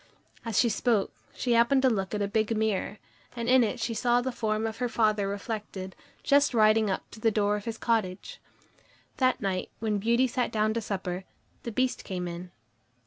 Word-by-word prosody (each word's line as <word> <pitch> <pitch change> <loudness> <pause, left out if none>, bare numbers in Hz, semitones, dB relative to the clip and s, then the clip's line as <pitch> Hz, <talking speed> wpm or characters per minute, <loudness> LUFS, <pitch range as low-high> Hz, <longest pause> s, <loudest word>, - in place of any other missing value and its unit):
As 230 -4 -3
she 240 - +5
spoke, 220 -2 +1 0.2
she 245 - 0
happened 235 +4 +4
to 260 - +6
look 195 -2 -2
at 205 - 0
a - - 0
big 215 +2 0
mirror, 215 -1 -1 0.4
and 235 -1 -3
in 255 0 +6
it 220 - -2
she 230 0 -2
saw 240 +2 +2
the 260 +1 -2
form 220 -2 -1
of 220 0 -4
her 245 -1 -1
father 215 -3 +1
reflected, 200 -2 -5 0.3
just 280 -2 +3
riding 215 -1 +4
up 190 - -3
to - - -11
the 225 - +3
door 210 -1 +1
of 205 - -6
his 230 -1 -4
cottage. 225 - -2 0.8
That 255 -1 +2
night, 190 -2 -2
when 215 -2 -1
Beauty 235 +5 +3
sat 250 0 -1
down 215 0 +1
to 230 - -1
supper, 190 -3 -4 0.4
the 235 - -5
Beast 255 +3 0
came 180 -3 -4
in. 175 +1 -7
220 Hz, 200 wpm, -28 LUFS, 205-235 Hz, 0.8 s, to